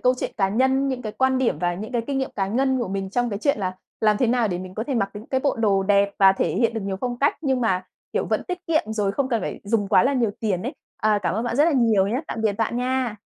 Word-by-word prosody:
câu 250 0 +3
chuyện - - -3
cá 195 -3 +2
nhân, 265 +5 +2
những 255 -2 -3
cái 215 -1 -5
quan 260 0 +2
điểm 260 - +1
và 175 -1 0
những 215 +6 -7
cái 235 -1 0
kinh 275 -1 -1
nghiệm 265 - -2
cá 195 -1 0
ngân 260 +5 +1
của 235 - -2
mình 195 0 -3
trong 245 +1 0
cái 200 - -3
chuyện 280 -2 +1
là 185 -2 -2 0.3
làm 215 -1 +3
thế 250 - +2
nào 235 -2 +2
để 175 -1 -2
mình 185 0 -8
có 220 - -3
thể 275 - -1
mặc 200 -4 0
những 210 +3 -9
cái 260 -1 0
bộ 280 - 0
đồ 200 -4 +2
đẹp 200 0 +3
và 195 -1 +7
thể - - 0
hiện 230 -1 +1
được 225 - -2
nhiều 195 -1 -3
phong 245 -1 -3
cách 285 - +2
nhưng 265 -4 0
mà, 190 -5 +1 0.3
kiểu, - - 0
vẫn - - 0
tiết 360 0 -4
kiệm 310 -10 0
rồi 205 -2 0
không 270 +2 -1
cần 230 -4 0
phải - - -5
dùng 205 -1 0
quá 185 - +5
là 275 - +2
nhiều 235 -5 +1
tiền 200 -5 -1
ấy. 265 +6 -4 0.2
À, 215 -1 +2
cảm 180 - 0
ơn 225 +3 -1
bạn 240 0 -2
rất 295 - +5
là 335 - +3
nhiều 225 -7 +3
nhá. 245 +7 -1
Tạm 225 - -4
biệt 215 -2 +2
bạn 225 +3 -1
nha. 250 -4 -1
225 Hz, 310 wpm, -23 LUFS, 200-260 Hz, 0.3 s, và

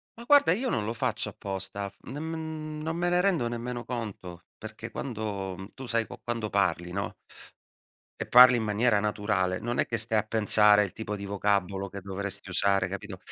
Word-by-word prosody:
Ma 235 - -11
guarda, 285 - +6
io 245 +7 0
non 105 -3 -1
lo 115 - -2
faccio 115 - -2
apposta. 100 0 -5
Non 145 +4 -7
mhmm, 160 -1 -5
non 160 +1 -2
me 175 +1 0
ne 175 0 +3
rendo 180 -10 +2
nemmeno 120 +1 -4
conto, 100 -8 -6 0.2
perché 110 +1 -8
quando 100 -5 -5
tu 130 - -9
sai 115 -1 +1
qu - - -11
quando 115 -3 -3
parli, 90 -3 0
no 100 +1 -3 1.1
e - - -4
parli 125 0 +8
in 115 - -1
maniera 110 +1 +2
naturale, 100 -3 0
non 120 +3 -3
è - - +2
che 115 - -1
stai 110 -1 +2
a - - -1
pensare 105 -1 +5
il 95 - -4
tipo 110 -2 -4
di 100 0 -6
vocabolo 100 -1 -1
che 100 +1 -7
dovresti 100 0 -5
usare, 95 0 +2
capito? 100 0 -6
105 Hz, 190 wpm, -28 LUFS, 100-125 Hz, 1.1 s, parli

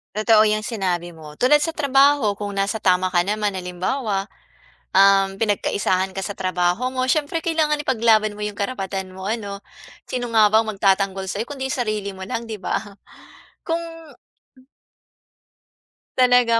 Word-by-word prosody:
Totoo 215 0 +5
yung 215 0 +2
sinabi 180 -6 -3
mo. 150 -2 -12
Tulad 295 +4 +4
sa 330 - -1
trabaho, 280 -7 +3
kung 205 0 -5
nasa 200 +2 -2
tama 185 -1 +3
ka 175 -1 +2
naman. 210 +1 -1
Halimbawa, 195 +3 -2 0.7
um, 195 0 +5
pinagkaisahan 195 -2 0
ka 195 - -3
sa 205 - -4
trabaho 185 +4 0
mo. 255 0 -2
Syempre 310 +2 -1
kailangan 315 -2 +1
ipaglaban 220 -5 +2
mo - - -6
yung 205 - -7
karapatan 195 -3 -4
mo 190 +1 -7
ano. 205 -2 -4 0.5
Sino 245 -2 -4
nga 220 -2 +6
ba 220 +2 +3
ang 220 - -3
magtatanggol 195 -1 +1
sa'yo 200 +3 -2
kundi 265 +1 -5
sarili 215 -6 -2
mo 190 - -8
lang 230 +4 -4
'di 220 - -5
ba? 200 - -2 0.9
Kung 330 0 0 2.4
Talaga. 245 -2 +4
210 Hz, 150 wpm, -21 LUFS, 195-245 Hz, 2.4 s, nga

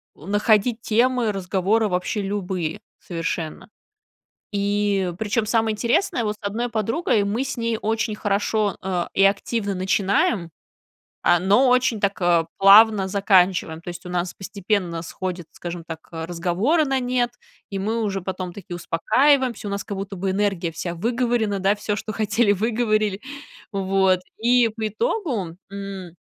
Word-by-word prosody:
находить 210 - +1
темы 240 0 +2
разговора 195 +3 +1
вообще 180 +3 -1
любые 190 -5 -3 0.2
совершенно. 165 -1 -4 0.8
И 200 -2 0
причем 220 +1 0
самое 220 0 +1
интересное: 235 - +1
вот 210 -1 -1
с 210 - -12
одной 230 +4 -2
подругой 225 - 0
мы 210 +6 -1
с - - -4
ней 230 -1 -1
очень 220 0 -1
хорошо, 205 0 0
а, 180 -2 -2
и 195 - +3
активно 200 +1 +1
начинаем, 190 - +1 0.7
а, 175 - +4
но 205 +8 +4
очень 250 -3 +2
так, 200 0 0
а, 170 -2 +3
плавно 200 0 +7
заканчиваем. 185 -4 +2
То 175 - -11
есть 175 0 -7
у 180 - -7
нас 175 0 -2
постепенно 190 -3 -2
сходят, 175 +1 -5
скажем 175 -1 -7
так, 160 -2 -6
а, 165 -1 -5
разговоры 185 - +1
на 270 -2 0
нет, 245 -1 0 0.4
и 195 - -3
мы 220 +4 -1
уже 195 -2 -1
потом 185 -1 -5
таки 180 -2 -8
успокаиваемся, 240 - +2
у - - -4
нас 200 0 -3
как 200 - -5
будто 195 0 -5
бы 190 +1 -1
энергия 195 -4 0
вся 170 +2 -5
выговорена, 230 0 0
да, 195 +2 +3
всё, 205 0 -3
что 215 - -5
хотели, 215 +1 +2
выговорили. 215 -1 0 0.5
Вот, 190 -1 +2 0.2
и 240 +1 +4
по 220 0 -4
итогу, 220 - -2 0.2
м, 195 -3 -7
200 Hz, 150 wpm, -23 LUFS, 185-225 Hz, 0.8 s, плавно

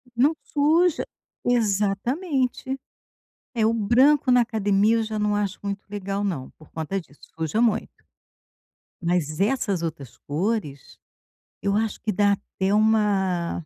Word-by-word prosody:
Não 280 +7 +4
suja. 320 +3 +2 0.4
Exatamente. 245 - 0 0.8
É, 220 -2 +2
o 225 - +3
branco 255 +5 +4
na 245 0 +6
academia 215 -1 +2
eu 225 - +1
já 215 0 -4
não 210 0 +1
acho 205 -1 -2
muito 200 0 -4
legal 200 0 -3
não, 160 -10 -3
por 155 - -19
conta 165 +5 -3
disso, 145 -3 -22 0.2
suja 160 +6 -1
muito. 225 -3 +1 1.1
Mas 170 -3 -1
essas 200 -4 +1
outras 150 -7 -6
cores 155 -3 -3 0.6
eu 200 0 0
acho 220 -1 -1
que 215 - -1
dá 205 +1 +3
até 195 0 -2
uma 195 -6 +1
205 Hz, 130 wpm, -24 LUFS, 190-230 Hz, 1.1 s, na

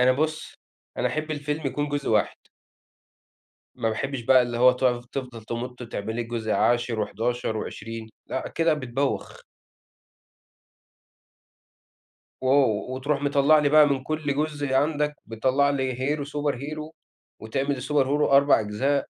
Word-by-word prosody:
أنا 125 +1 +5
بُص، 155 +3 -2 0.4
أنا - - +1
احب 155 0 -3
الفيلم 150 0 -3
يكون 145 +3 -2
جزء 145 -1 -2
واحد 105 -1 +2 1.4
ما 115 -3 -1
باحبش 130 +4 -3
بقى 130 +2 +5
اللي 120 -1 -3
هو 125 +1 +7
تقف 125 -1 0
تفضل 125 -4 -6
تمُط 125 +2 -5
وتعمل 110 -2 -5
لي 120 - -1
جزء 115 -2 -3
عاشر، 120 -2 +1
وحداشر 115 +1 -2
وعشرين 110 +1 -6 0.2
لأ، 130 - -3
كده 165 -1 +1
بتبوّخ. 135 -1 -3 3.0
و 130 - -1 0.5
وتروح 140 +2 -1
مطلع 145 +2 +4
لي 145 - +2
بقى 150 0 +7
من 135 -2 -1
كل 155 -1 -2
جزء 145 -2 -2
عندك، 150 +1 +1
بتطلع 130 +5 +1
لي 130 -3 -1
hero، 140 +4 -1
superhero 150 +1 -4 0.5
وتعمل 135 +4 -2
الsuperhero 145 +1 +1
4 140 -1 +6
أجزاء 130 +7 0
135 Hz, 130 wpm, -25 LUFS, 120-145 Hz, 3.0 s, هو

